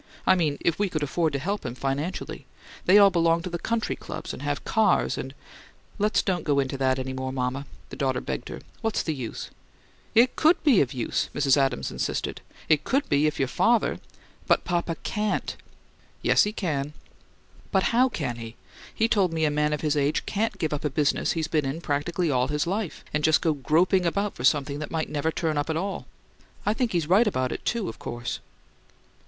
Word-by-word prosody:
"I - - +6
mean, 155 -6 +1
if 170 - 0
we 205 -1 +1
could 155 -3 -2
afford 160 +3 0
to - - +1
help 200 +9 -2
him 125 -1 -5
financially. 140 +7 -3 0.4
They 190 - +7
all 200 -1 +7
belong 170 -1 +2
to 180 - -5
the 170 - -3
country 230 +3 -1
clubs - - -7
and - - -8
have 145 0 -3
cars 220 -4 +2
and 130 +1 -6 0.3
" - - -27
"Let's 210 +1 +2
don't 180 -3 0
go 145 -2 +1
into 135 0 -1
that 130 -1 +2
any 130 0 -3
more, 130 0 -3
mama," 130 +2 -2 0.2
the - - -8
daughter 130 -2 0
begged 65 - -5
her. - - -7 0.2
"What's 225 -1 0
the 160 - -1
use?" 125 -6 -6 0.6
"It 240 +3 +5
COULD 320 +3 +3
be 275 -11 +5
of 130 - 0
use," 125 -3 -1
Mrs. 140 -2 +4
Adams 135 - 0
insisted. - - -3 0.3
"It 155 -2 +3
could 275 +2 +1
if 150 +1 +2
your 135 - +1
father 230 - +2 0.2
" - - -29
"But - - +3
papa 170 -1 -1
CAN'T." 210 0 -1 0.7
"Yes, - - +5
he 210 - -1
can." 150 -9 -2 0.8
"But 190 -2 +3
how 255 +3 +5
can 135 - -3
he? 115 0 -8 0.4
He 225 - +2
told 200 -6 +2
me 160 -1 +1
a 150 - +2
man 150 0 +1
of 150 - -2
his 150 -1 +1
age 145 +1 +1
CAN'T 215 0 -1
give 160 -5 -1
up 150 - -3
a 150 - +1
business 145 +1 +1
he's 160 -2 -1
been 155 -1 +1
in 135 +4 -3
practically 165 +2 -1
all 125 -1 +2
his 150 +3 0
life, 195 0 -3
and 150 0 0
just 155 0 +5
go 160 - +1
groping 170 +6 +2
about 200 +4 0
for 120 - -8
something 140 +2 +2
that 155 - -5
might 160 -1 -2
never 150 +2 0
turn 155 -2 -1
up 145 - -2
at 160 - 0
all. 195 +3 -3 0.6
I 210 - +3
think 240 0 -1
he's 170 -3 0
right 195 +8 +4
about 130 -10 0
it, - - -5
too, 230 -5 0
of - - -7
course!" 120 0 -4
155 Hz, 215 wpm, -26 LUFS, 140-190 Hz, 0.8 s, They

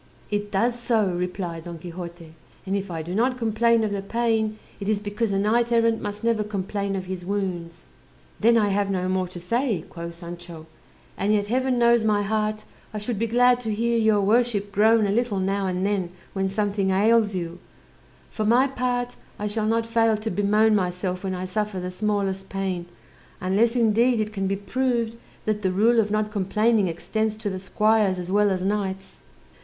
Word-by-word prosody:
"It 205 0 -2
does 235 +5 +1
so," 225 -5 +1
replied 175 -2 -4
Don 170 -1 -6
Quixote; 170 -1 -9 0.3
"and 195 +1 -1
if 200 0 -3
I 165 -2 -4
do 175 +3 -5
not 250 +5 +1
complain 230 0 +2
of 215 - -1
the 200 -1 -2
pain, 220 0 0 0.2
it 200 0 -3
is 215 -2 +2
because 210 +2 -2
a 195 - +1
knight 230 +4 +2
errant 230 -1 +3
must 205 0 -5
never 230 -2 +2
complain 200 -1 -3
of 190 -1 -3
his 185 -1 -5
wounds." 180 -3 -3 0.6
"Then 230 +2 +5
I 210 -2 +3
have 200 0 +1
no 185 -2 -1
more 185 0 0
to 175 0 -9
say," 225 - -1
quoth 170 -1 -7
Sancho; 170 -1 -9 0.5
"and 200 +2 +1
yet 205 -1 +2
Heaven 255 +3 0
knows 235 -1 +4
my 210 -1 +2
heart, 215 +1 -1 0.3
I 215 - -5
should 210 0 -3
be 230 - +1
glad 245 +2 +4
to 225 -3 -3
hear 235 +2 +1
your 220 -2 +3
worship 210 -1 +1
groan 220 +2 +4
a 200 - +1
little 225 -2 0
now 195 +1 0
and 185 +1 -1
then 200 -3 0 0.2
when 195 -1 0
something 200 -1 0
ails 210 +2 +3
you: 170 -1 -4 0.7
for 215 - -2
my 240 +5 +4
part, 245 -2 -2 0.2
I 210 - -4
shall 210 +1 -1
not 225 +1 +1
fail 225 -1 +2
to 220 +1 -4
bemoan 210 +3 +3
myself 180 -1 -1
when 190 -1 -2
I 180 +1 -4
suffer 210 +1 -2
the 180 0 -4
smallest 195 -1 -1
pain, 190 -3 -3 0.5
unless, 205 +6 +2
indeed, 235 +1 +3
it 215 0 -2
can 195 -2 -1
be 195 - 0
proved 230 +3 -1 0.3
that 215 -1 0
the 190 -2 +1
rule 225 +5 +4
of 210 -2 +2
not 215 0 0
complaining 210 +1 +2
extends 215 +6 -2
to 215 -2 -3
the 190 - -4
squires 210 0 +2
as 180 0 -5
well 205 +1 +4
as 185 -1 -1
knights." 195 -1 -3
205 Hz, 195 wpm, -24 LUFS, 190-225 Hz, 0.7 s, Then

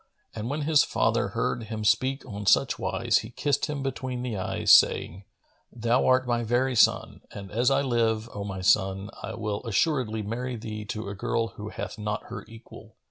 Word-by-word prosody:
And 110 +2 -5
when 150 +2 -2
his 155 -1 +4
father - - +1
heard 115 - -2
him 110 -1 -5
speak 130 +6 +1
on 105 -4 -7
such - - +3
wise, - - +1
he 110 - -8
kissed 140 +4 0
him 145 -3 -4
between 130 -2 -4
the 125 -4 -3
eyes, 95 - +2
saying, 95 +4 +4 0.5
"Thou 120 +2 +1
art 130 0 +4
my 120 -1 +1
very 125 +3 +1
son, - - +3
and 100 -2 -9
as 120 +4 +2
I 140 0 +2
live, 115 -3 0
O 100 - -5
my 95 -2 -5
son, 95 0 +2
I - - -5
will 105 -2 -3
assuredly 115 -1 0
marry 125 +4 -4
thee 110 -2 -6
to 110 0 -5
a 100 - -4
girl 115 +3 -1
who 105 -1 -8
hath 100 -1 -6
not 105 0 -3
her - - -6
equal!" 115 0 -14
115 Hz, 190 wpm, -26 LUFS, 105-125 Hz, 0.5 s, his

